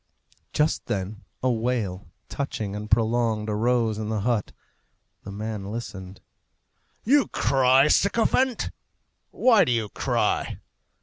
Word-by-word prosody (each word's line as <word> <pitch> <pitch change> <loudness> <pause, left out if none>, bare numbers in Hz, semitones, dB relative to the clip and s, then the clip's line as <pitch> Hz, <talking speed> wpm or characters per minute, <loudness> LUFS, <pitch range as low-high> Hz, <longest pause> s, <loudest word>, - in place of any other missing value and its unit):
Just 150 +1 0
then 100 +2 -4 0.2
a 130 - +3
wail, 110 -5 -2 0.2
touching 110 -8 -4
and 105 +1 -6
prolonged, 110 -1 +1
arose 115 0 +1
in 110 -1 -4
the 110 -2 -1
hut. 115 -1 0 0.7
The 100 - -9
man 105 0 -5
listened. 95 -4 -7 0.8
"You 275 +3 +4
cry, 135 +1 +3
sycophant! 230 +7 +2 0.6
Why 235 -5 +4
do - - 0
you 115 -3 0
cry?" - - -1
115 Hz, 115 wpm, -25 LUFS, 105-130 Hz, 0.8 s, You